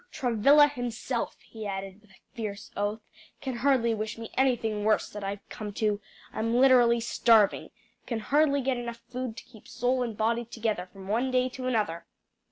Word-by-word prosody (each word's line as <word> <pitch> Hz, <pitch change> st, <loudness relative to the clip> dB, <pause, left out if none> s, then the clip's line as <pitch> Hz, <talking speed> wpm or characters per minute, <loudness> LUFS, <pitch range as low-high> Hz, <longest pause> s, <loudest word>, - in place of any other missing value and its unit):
Travilla 275 Hz, +5 st, +5 dB
himself," 245 Hz, -2 st, -3 dB
he 220 Hz, -2 st, -7 dB
added, 195 Hz, 0 st, -5 dB
with 210 Hz, -, -24 dB
a 195 Hz, -, -19 dB, 0.2 s
fierce 210 Hz, -4 st, -6 dB
oath, 205 Hz, +2 st, -2 dB, 0.4 s
"can 260 Hz, -3 st, -4 dB
hardly 240 Hz, -3 st, +2 dB
wish 215 Hz, 0 st, -4 dB
me 225 Hz, -1 st, -8 dB
anything 230 Hz, -5 st, +1 dB
worse 215 Hz, 0 st, +2 dB
than 210 Hz, -1 st, -8 dB
I've 200 Hz, 0 st, -5 dB
come 210 Hz, -1 st, -6 dB
to. 210 Hz, 0 st, 0 dB, 0.3 s
I'm 230 Hz, +2 st, -1 dB
literally 245 Hz, -2 st, +5 dB
starving 225 Hz, -2 st, +3 dB, 0.4 s
can 235 Hz, -, -2 dB
hardly 280 Hz, +5 st, +2 dB
get 260 Hz, -1 st, 0 dB
enough 235 Hz, -1 st, -6 dB
food 250 Hz, -2 st, -4 dB
to -, -, -8 dB
keep 225 Hz, -4 st, -17 dB
soul 250 Hz, +1 st, 0 dB
and 230 Hz, -4 st, -3 dB
body 230 Hz, +2 st, +1 dB
together 220 Hz, -5 st, -3 dB
from 190 Hz, -1 st, -11 dB
one 235 Hz, +6 st, +1 dB
day 255 Hz, 0 st, +2 dB
to 255 Hz, 0 st, -6 dB
another." 210 Hz, -9 st, -1 dB
230 Hz, 175 wpm, -28 LUFS, 210-250 Hz, 0.4 s, Travilla